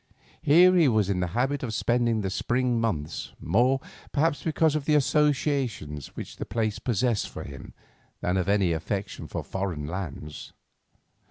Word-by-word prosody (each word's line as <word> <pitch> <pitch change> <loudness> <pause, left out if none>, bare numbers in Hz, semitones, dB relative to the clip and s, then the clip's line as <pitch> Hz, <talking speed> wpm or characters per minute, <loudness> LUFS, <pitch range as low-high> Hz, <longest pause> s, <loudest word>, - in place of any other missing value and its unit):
Here 180 +5 +6
he 170 -4 +5
was 110 -5 +2
in 90 - 0
the 90 - 0
habit 135 +3 +1
of 115 -4 -3
spending 120 -2 +1
the 95 -2 -2
spring 120 +3 0
months, 80 -10 -2
more, 125 +10 +2 0.3
perhaps, 155 +1 +1
because 160 -1 +2
of 150 -2 -1
the 150 - +3
associations 140 - +1
which - - -7
the - - -3
place 110 0 -1
possessed 120 -1 0
for - - -7
him 70 -2 -10 0.4
than 90 - 0
of 95 0 0
any 100 -4 +3
affection 95 +4 -4
for - - -4
foreign 95 -6 -3
lands. 75 -3 -6
115 Hz, 160 wpm, -27 LUFS, 95-135 Hz, 0.4 s, Here